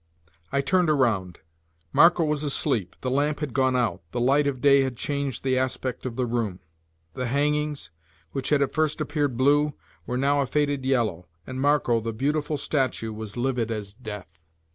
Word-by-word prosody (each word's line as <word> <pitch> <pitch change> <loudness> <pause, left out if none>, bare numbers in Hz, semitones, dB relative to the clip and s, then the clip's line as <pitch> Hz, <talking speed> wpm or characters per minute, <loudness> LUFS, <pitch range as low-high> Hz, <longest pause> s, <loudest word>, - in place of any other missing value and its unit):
I 140 - +2
turned 175 +5 +2
around. 110 - +1 0.5
Marco 170 0 +6
was 150 -1 -1
asleep, 135 - 0
the 130 - -2
lamp 145 +2 +1
had 150 -5 -4
gone 130 -1 +2
out, 120 -3 0
the 120 - -1
light 140 +4 +3
of 135 -3 -2
day 140 0 +5
had 130 -3 -2
changed 140 -3 -3
the 130 -1 +2
aspect 130 0 -2
of 120 - -6
the 130 0 0
room; 115 -6 -2 0.5
the 125 - -3
hangings, 150 -4 0 0.4
which 135 - -2
had 145 -2 +4
at 140 - -3
first 155 -1 +1
appeared 145 -4 -1
blue, 145 +3 +3 0.3
were 125 - -2
now 140 +2 +2
a 135 - -1
faded 145 -1 0
yellow, 110 -10 0 0.2
and 130 0 -5
Marco, 145 -5 +3
the 115 +1 -3
beautiful 150 +5 -1
statue, 130 -7 -1
was 110 0 -7
livid 120 -2 0
as 105 -3 -4
death. 105 -8 -9
130 Hz, 180 wpm, -25 LUFS, 120-145 Hz, 0.5 s, Marco